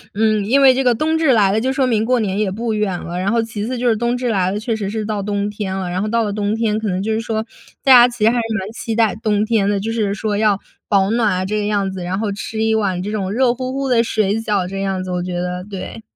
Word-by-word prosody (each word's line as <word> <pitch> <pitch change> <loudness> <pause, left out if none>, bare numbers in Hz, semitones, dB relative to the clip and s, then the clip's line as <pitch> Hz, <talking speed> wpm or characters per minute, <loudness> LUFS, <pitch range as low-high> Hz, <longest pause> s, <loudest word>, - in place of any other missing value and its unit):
嗯， 215 -1 +2
因 265 +6 +3
为 265 -1 +7
这 265 +1 0
个 245 -2 +3
冬 315 +5 0
至 290 -6 +4
来 200 -3 +4
了 220 +2 +1
就 260 +1 0
说 265 -1 +1
明 220 -3 +1
过 250 0 +2
年 200 -1 -1
也 210 -3 +1
不 225 +2 -2
远 205 -4 -1
了， 175 +1 -5
然 195 +2 0
后 230 -1 +2
其 220 -2 -5
次 255 0 -3
就 245 0 -1
是 225 - +3
冬 240 +2 0
至 245 -1 -2
来 185 -4 +1
了， 205 - -2
确 230 0 -2
实 205 -3 -3
是 215 0 -3
到 210 -2 -2
冬 205 0 -1
天 205 -2 -4
了， 190 -2 -3
然 180 +2 -2
后 215 - -1
到 230 +1 +1
了 205 -1 -2
冬 210 +1 -1
天 220 -1 0
可 220 - -3
能 185 +1 -1
就 220 +1 -1
是 220 - 0
说 220 -1 -2 0.4
大 265 - +7
家 245 0 +9
其 235 -3 -5
实 225 - +6
还 245 - -1
是 230 - -1
蛮 195 +3 -6
期 225 -1 -4
待 225 -3 +3
冬 210 -1 +1
天 215 -3 +1
的。 200 -1 +1
就 225 +3 -3
是 210 -3 0
说 210 -1 -2
要 210 -2 +2 0.3
保 200 0 +2
暖 230 -2 +2
啊 185 0 -1
这 210 +2 -2
个 205 - -2
样 200 -2 0
子， 190 -1 -6
然 180 +2 -2
后 215 -2 -1
吃 220 +2 -4
一 220 0 +2
碗 190 -4 0
这 205 - -4
种 195 -3 -2
热 245 +2 +2
乎 255 +1 -4
乎 275 0 -2
的 230 -2 +4
水 215 -2 0
饺 200 -5 0
这 195 +1 -5
样 190 -1 -2
子 185 - -5
我 180 0 -1
觉 180 -1 -3
得， 180 0 -3
对。 205 +2 -7
215 Hz, 330 characters per minute, -19 LUFS, 195-230 Hz, 0.4 s, 家